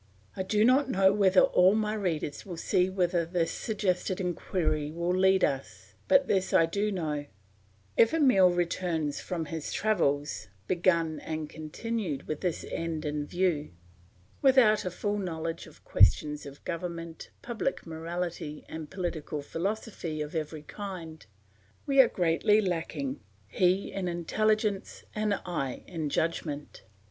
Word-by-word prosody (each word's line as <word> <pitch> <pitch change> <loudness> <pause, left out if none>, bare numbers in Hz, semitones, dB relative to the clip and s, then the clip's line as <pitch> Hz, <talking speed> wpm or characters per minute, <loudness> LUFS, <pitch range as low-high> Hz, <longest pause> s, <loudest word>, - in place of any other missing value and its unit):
I - - -2
do 210 +3 +2
not 265 +2 +4
know 190 -4 +4
whether 195 -2 +5
all 185 +3 +5
my 215 -1 0
readers 175 -8 -2
will 180 -4 -7
see 180 +2 +2
whither 180 -2 +1
this 170 0 -1
suggested 190 -4 -1
inquiry 170 -4 -1
will 170 +2 -1
lead 190 0 +4
us; 100 -8 -2
but 275 -1 +5
this 190 -2 +1
I 165 - +6
do 200 +5 -1
know, 150 -6 -2 0.7
if 230 - +5
Emile 255 - +5
returns 170 -4 -1
from 170 -3 -3
his 160 0 -5
travels, 150 - 0 0.2
begun 170 - +1
and 155 -1 -4
continued 160 +1 -4
with 155 - -3
this 180 -3 -2
end 165 -2 -3
in 150 0 -2
view, 175 - 0 0.7
without 255 -7 +5
a - - 0
full 205 +3 -2
knowledge 165 -3 -4
of 155 - -18
questions 150 +10 +3
of 140 0 -12
government, 170 -1 -5
public 240 +2 -2
morality, 165 -1 -5
and 160 -2 -7
political 160 -5 -4
philosophy 180 -1 -3
of 150 0 -4
every 155 -1 -4
kind, 170 - -8 0.6
we 275 -1 +6
are 255 - +5
greatly 180 +4 +3
lacking, 165 -8 -2 0.3
he 180 - +1
in 190 -2 -3
intelligence 210 +4 0
and 210 -1 +1
I 145 -8 -3
in 160 -4 -3
judgment. 150 -2 -2
175 Hz, 140 wpm, -29 LUFS, 155-195 Hz, 0.7 s, I